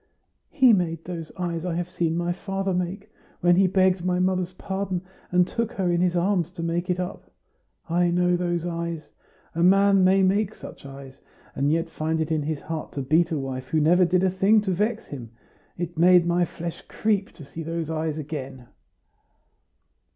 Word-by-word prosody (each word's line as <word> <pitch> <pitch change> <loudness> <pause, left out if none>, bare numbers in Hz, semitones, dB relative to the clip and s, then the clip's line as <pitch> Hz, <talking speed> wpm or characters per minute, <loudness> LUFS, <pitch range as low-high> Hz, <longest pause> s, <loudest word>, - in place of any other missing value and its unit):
"He 260 -6 +5
made 165 -4 0
those 170 -3 -6
eyes 170 -2 -3
I 180 -2 -2
have 175 0 -2
seen 170 -2 -1
my 175 0 0
father 195 +1 -3
make, 180 +2 -3 0.3
when 175 0 +5
he 190 +1 +4
begged 185 -1 +2
my 180 0 +1
mother's 185 0 0
pardon 190 -1 -3 0.3
and 180 0 +3
took 230 -1 -2
her 190 -5 0
in 175 0 +1
his 180 -1 +1
arms 175 -1 +1
to 170 -3 -6
make 170 +2 -2
it 180 0 0
up. 180 +1 -5 0.6
I 175 +1 +2
know 180 +1 +2
those 175 -1 -1
eyes. 170 -2 -4 0.4
A 170 - -2
man 195 +1 +5
may 190 +1 +4
make 205 +2 +1
such - - -11
eyes, 135 -1 -11 0.3
and 140 +1 +1
yet 165 +1 +1
find 160 +1 -2
it 160 0 -2
in 155 -1 +1
his 150 0 -3
heart 160 -1 -6
to 140 - -3
beat 160 +5 +3
a 160 - -1
wife 130 -2 -5
who 155 - +1
never 175 +4 +4
did 180 +1 +2
a 190 - +3
thing 195 +4 +4
to 200 -2 -2
vex 210 +5 -1
him! 125 -5 -8 0.5
It 175 -1 -4
made 180 0 +6
my 175 +1 +2
flesh 170 0 -7
creep 205 -3 -1
to 150 - -12
see 165 - -8
those 165 0 -3
eyes 160 -1 -2
again." 135 -5 -7
175 Hz, 195 wpm, -25 LUFS, 160-185 Hz, 0.6 s, made